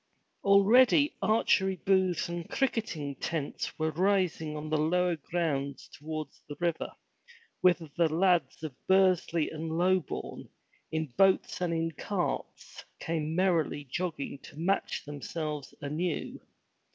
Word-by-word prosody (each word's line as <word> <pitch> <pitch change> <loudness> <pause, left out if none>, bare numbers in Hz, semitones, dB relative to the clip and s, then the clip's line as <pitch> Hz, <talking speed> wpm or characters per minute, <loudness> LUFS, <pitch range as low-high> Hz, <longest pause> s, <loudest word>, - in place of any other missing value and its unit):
Already 240 +9 +5
archery 195 -2 +3
booths 185 -1 +1
and 170 -1 -5
cricketing 220 - -1
tents 160 -4 -3
were 160 0 0
rising 175 -3 +1
on 150 +1 -5
the 155 - +3
lower 175 +3 +2
grounds 145 -4 -2
towards 155 +1 -6
the 145 - -5
river, 170 -2 -1 0.7
whither 175 -3 +3
the 170 -2 +2
lads 170 -4 +2
of 155 -4 -4
Bursley 185 -4 +3
and 160 +1 -5
Lobourne, 185 -2 -1 0.4
in 160 0 0
boats 195 -1 +3
and 175 -2 0
in 165 0 0
carts, 180 +4 -4 0.2
came 160 -1 -2
merrily 170 -5 +1
jogging 165 -5 -3
to 145 - -14
match 185 +5 -1
themselves 150 0 -5
anew. 155 +4 -3
170 Hz, 120 wpm, -30 LUFS, 155-185 Hz, 0.7 s, Already